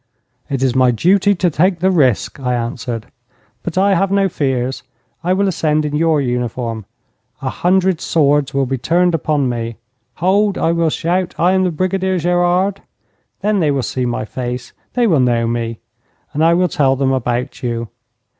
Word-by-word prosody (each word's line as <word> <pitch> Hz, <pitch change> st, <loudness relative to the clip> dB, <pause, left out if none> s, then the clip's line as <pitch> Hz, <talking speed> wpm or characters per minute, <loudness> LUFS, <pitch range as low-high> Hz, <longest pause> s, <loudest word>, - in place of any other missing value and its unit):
'It 135 Hz, -2 st, -1 dB
is 130 Hz, -2 st, +2 dB
my 130 Hz, -1 st, +4 dB
duty 190 Hz, -, +3 dB
to 175 Hz, -1 st, +1 dB
take 180 Hz, +4 st, +2 dB
the 190 Hz, +2 st, +2 dB
risk,' 140 Hz, -, +1 dB
I 125 Hz, -2 st, -1 dB
answered; 115 Hz, -1 st, -4 dB, 0.6 s
'but 175 Hz, 0 st, -5 dB
I 195 Hz, +1 st, +4 dB
have 195 Hz, +1 st, +1 dB
no 195 Hz, 0 st, +2 dB
fears. 130 Hz, -4 st, -1 dB, 0.4 s
I 180 Hz, -, 0 dB
will 200 Hz, +1 st, +1 dB
ascend 155 Hz, -4 st, 0 dB
in 150 Hz, 0 st, -2 dB
your 160 Hz, 0 st, +2 dB
uniform. 120 Hz, -4 st, -3 dB, 0.6 s
A 130 Hz, -, -1 dB
hundred 185 Hz, -1 st, +1 dB
swords 145 Hz, -3 st, +2 dB
will 135 Hz, 0 st, +1 dB
be 130 Hz, 0 st, -3 dB
turned 175 Hz, +6 st, +2 dB
upon 150 Hz, -2 st, 0 dB
me. 115 Hz, -2 st, -3 dB, 0.4 s
"Hold!" 195 Hz, +3 st, +2 dB
I 165 Hz, -, +1 dB
will 170 Hz, -1 st, +1 dB
shout, 175 Hz, +3 st, -1 dB
"I 175 Hz, +2 st, +3 dB
am 190 Hz, 0 st, +2 dB
the -, -, +2 dB
Brigadier 185 Hz, +3 st, -1 dB
Gerard!" 175 Hz, +3 st, +1 dB, 0.6 s
Then 205 Hz, 0 st, +1 dB
they 155 Hz, -4 st, +2 dB
will 140 Hz, -2 st, 0 dB
see 125 Hz, +2 st, -2 dB
my 120 Hz, -2 st, -2 dB
face. 125 Hz, +2 st, -5 dB, 0.2 s
They 245 Hz, -1 st, +3 dB
will 165 Hz, -10 st, +3 dB
know 120 Hz, -2 st, +2 dB
me. 115 Hz, -1 st, -2 dB, 0.6 s
And 150 Hz, -, 0 dB
I 165 Hz, +1 st, +5 dB
will 180 Hz, +1 st, +3 dB
tell 135 Hz, -6 st, +2 dB
them 135 Hz, 0 st, +1 dB
about 125 Hz, +1 st, -2 dB
you. 115 Hz, -3 st, -3 dB
150 Hz, 180 wpm, -17 LUFS, 125-180 Hz, 0.6 s, I